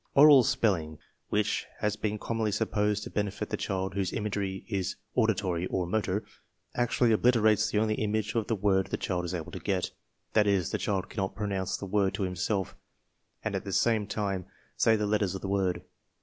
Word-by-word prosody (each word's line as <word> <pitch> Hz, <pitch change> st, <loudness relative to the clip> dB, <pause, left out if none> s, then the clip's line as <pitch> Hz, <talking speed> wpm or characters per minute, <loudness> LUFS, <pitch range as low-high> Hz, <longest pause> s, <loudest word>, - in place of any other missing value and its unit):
Oral 145 Hz, -1 st, +9 dB
spelling, 85 Hz, -10 st, +1 dB, 0.3 s
which 105 Hz, 0 st, 0 dB
has 105 Hz, -1 st, 0 dB
been 105 Hz, 0 st, -2 dB
commonly 110 Hz, 0 st, -1 dB
supposed 105 Hz, -1 st, 0 dB
to -, -, -8 dB
benefit 105 Hz, -2 st, -2 dB
the -, -, +1 dB
child 95 Hz, -1 st, -2 dB
whose 95 Hz, -2 st, -1 dB
imagery 100 Hz, -3 st, -2 dB
is 100 Hz, -4 st, -2 dB, 0.2 s
auditory 95 Hz, -6 st, +1 dB
or 90 Hz, -, -1 dB
motor, 100 Hz, +1 st, -1 dB, 0.5 s
actually 120 Hz, 0 st, +2 dB
obliterates 110 Hz, -2 st, +4 dB
the 105 Hz, -, -1 dB
only 110 Hz, 0 st, +2 dB
image 110 Hz, 0 st, -1 dB
of 115 Hz, -3 st, 0 dB
the 115 Hz, -, +1 dB
word 95 Hz, -1 st, +2 dB
the -, -, -2 dB
child 90 Hz, -2 st, -2 dB
is 90 Hz, +1 st, -3 dB
able 85 Hz, +1 st, -5 dB
to 95 Hz, -, -6 dB
get. 95 Hz, -2 st, -1 dB, 0.4 s
That 105 Hz, -1 st, +4 dB
is, 95 Hz, -4 st, +2 dB
the -, -, -1 dB
child 95 Hz, -3 st, -1 dB
cannot 95 Hz, -2 st, -3 dB
pronounce 100 Hz, -2 st, -2 dB
the -, -, -6 dB
word 100 Hz, 0 st, +1 dB
to 100 Hz, -, -2 dB
himself 95 Hz, +1 st, -1 dB, 0.7 s
and -, -, -2 dB
at -, -, -2 dB
the 100 Hz, -, -5 dB
same 105 Hz, +2 st, +2 dB
time 100 Hz, -3 st, -2 dB, 0.3 s
say 115 Hz, -1 st, +4 dB
the 105 Hz, -1 st, 0 dB
letters 105 Hz, -2 st, +1 dB
of 95 Hz, -, -5 dB
the -, -, -2 dB
word. 95 Hz, -3 st, 0 dB
100 Hz, 190 wpm, -29 LUFS, 95-110 Hz, 0.7 s, Oral